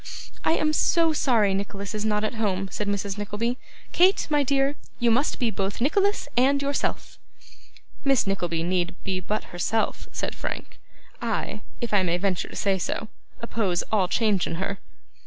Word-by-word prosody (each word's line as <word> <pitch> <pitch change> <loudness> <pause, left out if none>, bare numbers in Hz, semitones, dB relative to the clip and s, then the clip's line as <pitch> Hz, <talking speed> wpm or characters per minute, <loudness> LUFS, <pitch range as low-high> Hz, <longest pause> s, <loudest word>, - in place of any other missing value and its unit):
'I - - +3
am 310 -1 +2
so 330 +1 +3
sorry 230 -9 +3
Nicholas 200 0 -3
is 210 -1 -2
not 210 -1 +1
at 215 - -1
home,' 195 -4 -1
said 210 - -3
Mrs. 200 0 -2
Nickleby. 215 +4 -2 0.3
'Kate, 370 +3 +5
my 295 -1 +4
dear, 275 +1 +2 0.2
you 240 -1 +3
must 270 +6 +2
be 235 -3 +1
both 195 -1 -2
Nicholas 395 - +2
and 270 +3 +4
yourself.' 280 0 -2 0.8
'Miss 275 -3 +3
Nickleby 175 -4 -1
need 175 0 0
be 190 -1 -1
but 210 +3 -4
herself,' 215 +5 -1
said - - -3
Frank. - - -6 0.4
'I - - -2 0.2
if 235 -3 -3
I 205 - +5
may 175 -1 +1
venture 185 -2 0
to - - -10
say 195 -2 +1
so 215 +4 -3 0.3
oppose 205 -7 0
all 200 -4 +3
change 205 -2 +2
in - - -3
her. 195 +3 -3
210 Hz, 170 wpm, -25 LUFS, 195-260 Hz, 0.8 s, Kate